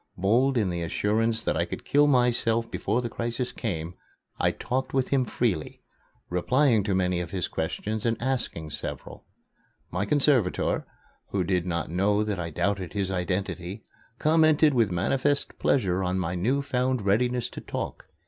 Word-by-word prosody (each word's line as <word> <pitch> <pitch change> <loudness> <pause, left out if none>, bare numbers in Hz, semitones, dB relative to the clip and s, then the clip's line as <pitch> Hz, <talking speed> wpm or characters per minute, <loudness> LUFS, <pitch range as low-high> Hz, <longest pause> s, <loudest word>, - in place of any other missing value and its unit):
Bold 120 +8 +3
in 100 -5 +1
the 85 0 -3
assurance 110 +7 0
that - - 0
I - - +2
could - - -7
kill 145 +1 +4
myself 120 -3 +2
before 115 +5 -1
the - - -1
crisis 120 +2 -3
came, 85 -7 -4 0.5
I - - +3
talked 130 +2 -3
with 130 -1 +1
him 135 -2 +2
freely, 105 -11 -2 0.4
replying 120 +6 +3
to 100 -3 +1
many 90 -1 +1
of 85 - -5
his 90 -3 -2
questions 105 +6 -3
and 115 -1 0
asking 120 -11 -2
several. - - -5 0.6
My 90 +4 -1
conservator, 135 -7 +2 0.4
who 95 -2 -1
did 90 0 0
not 85 -2 -2
know 100 +4 +2
that 105 -4 -2
I 85 -1 -3
doubted 95 +3 -1
his 100 -2 -1
identity, 95 +2 -3 0.3
commented 155 -1 +4
with 115 -5 +3
manifest 135 +11 0
pleasure 95 -8 +2
on 90 0 0
my 90 -2 -1
new 125 +11 0
found 130 -3 0
readiness 120 +4 +2
to - - -7
talk. - - -5
105 Hz, 160 wpm, -27 LUFS, 90-125 Hz, 0.6 s, kill